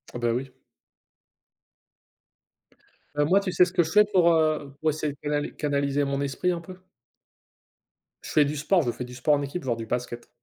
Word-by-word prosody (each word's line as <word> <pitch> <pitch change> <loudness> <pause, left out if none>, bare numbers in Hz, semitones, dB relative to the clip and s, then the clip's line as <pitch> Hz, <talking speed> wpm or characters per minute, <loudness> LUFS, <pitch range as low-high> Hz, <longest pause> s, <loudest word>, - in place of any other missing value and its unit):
Ah - - -3
bah 120 -1 +1
oui. 130 +2 -3 2.6
Heu, 145 - +2
moi, 195 +5 +4
tu 195 -2 -3
sais 180 - +5
ce 180 - -7
que 175 - +3
je 160 - -5
fais 210 0 +6
pour, 175 -2 +5
heu, 155 -3 +1
pour 160 - +2
essayer 150 -1 -2
de - - -20
canali 145 0 -2
canaliser 140 -1 0
mon 140 0 -1
esprit 140 +6 -1
un 170 - -3
peu? 180 +2 -11 1.4
Je - - -9
fais 150 - +4
du 145 +2 -3
sport, 175 +5 +2
je 120 - 0
fais 125 - -6
du 125 - -11
sport 140 +4 +2
en 145 - -2
équipe, 140 +5 -5
genre 125 -3 -1
du 115 -1 -6
basket. 120 0 -4
145 Hz, 200 wpm, -26 LUFS, 135-170 Hz, 2.6 s, fais